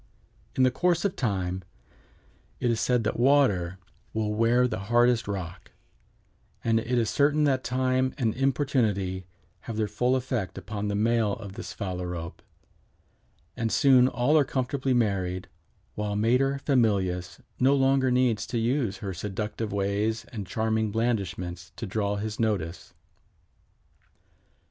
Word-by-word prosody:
In 130 - +3
the 130 - +4
course 175 +6 +1
of 195 - 0
time 95 -6 -2 1.0
it 120 - +1
is 115 - 0
said 125 -2 +2
that 110 - -2
water 120 -10 +3 0.4
will 110 -1 0
wear 115 +3 +3
the 100 -5 -4
hardest 120 -1 +3
rock, 90 -4 -5 0.9
and 115 -1 +2
it 125 +2 -1
is 115 -2 +2
certain 145 +4 +2
that 135 -3 +2
time 130 0 0
and 115 -6 +1
importunity 115 - 0 0.4
have 115 - -5
their 110 -1 +1
full 125 +4 +1
effect 125 -8 -2
upon 100 +2 -4
the 100 - -1
male 110 0 +2
of 100 -6 -7
this - - -7
Phalarope, 90 -3 -5 1.1
and 115 -1 -1
soon 130 -3 +5
all 130 +4 +1
are - - +5
comfortably 130 0 -1
married, 95 -5 0 0.4
while 105 +3 -3
mater 125 +6 +2
familias 100 - +1 0.2
no 135 +2 +4
longer 135 -1 +3
needs 125 -4 +1
to 120 - -2
use 115 -3 0
her 95 - -3
seductive 105 +4 -4
ways 100 +3 -1
and 105 -5 -5
charming 110 +1 0
blandishments 95 -6 -2
to 115 - -5
draw 100 0 -1
his 105 +1 -4
notice." 95 -7 -2
110 Hz, 140 wpm, -27 LUFS, 100-125 Hz, 1.1 s, soon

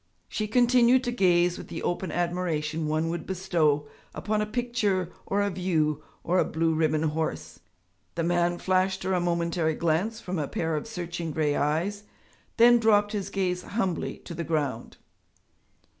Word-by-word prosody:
She 215 - -3
continued 245 +2 +4
to 245 - -1
gaze 180 -5 +3
with - - -9
the 165 - -6
open 175 -1 -2
admiration 165 -3 -1
one 155 +1 0
would 170 +1 -4
bestow 165 -6 +1 0.3
upon 210 +7 -1
a 210 - -1
picture 210 -6 -1 0.2
or 205 +1 +1
a 200 - 0
view 160 -5 0 0.2
or 180 +2 +2
a - - +5
blue 165 +1 0
ribbon 155 -1 +1
horse. 160 0 -3 0.6
The 170 - -1
man 175 +1 +1
flashed 185 +1 +1
her 190 - 0
a 180 - +2
momentary 170 -2 0
glance 170 +9 0
from 185 -6 -4
a 145 - -1
pair 160 +2 -2
of 150 - -4
searching 175 -5 -5
grey 150 -1 0
eyes, 175 +8 -1 0.5
then 240 +1 +7
dropped 205 -2 +3
his 200 -2 -3
gaze 185 -2 -1
humbly 190 -4 -2
to - - -7
the 170 +1 -4
ground. 150 -8 -2
175 Hz, 165 wpm, -27 LUFS, 160-200 Hz, 0.6 s, then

